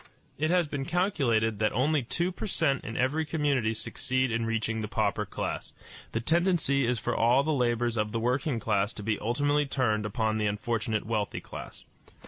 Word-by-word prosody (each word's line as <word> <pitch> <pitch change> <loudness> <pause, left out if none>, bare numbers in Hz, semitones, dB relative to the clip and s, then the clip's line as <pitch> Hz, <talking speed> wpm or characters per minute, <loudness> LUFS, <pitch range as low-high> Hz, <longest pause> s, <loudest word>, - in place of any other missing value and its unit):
It 155 +1 +1
has 175 -2 +3
been 145 -2 -3
calculated 135 - +1
that 110 0 +2
only 145 +5 +2
two 170 +9 -1
per 200 - -5
cent 155 -8 +1
in 110 +2 -5
every 140 +5 +1
community 145 -8 +1
succeed 130 +3 -1
in 115 0 0
reaching 115 0 -1
the 105 - -3
pauper - - 0
class. - - -4 0.4
The 115 - 0
tendency 160 -2 +2
is 125 0 +1
for 120 +2 -2
all 120 +4 +4
the 155 +1 0
labors 120 -3 +1
of 105 0 0
the 115 - -1
working 125 +2 0
class 105 -1 0
to 105 - -8
be 110 0 0
ultimately 145 +6 +1
turned 110 -6 0
upon 110 0 0
the 105 - +1
unfortunate 110 +1 -1
wealthy 110 -2 -1
class. - - -9
120 Hz, 185 wpm, -28 LUFS, 110-145 Hz, 0.4 s, all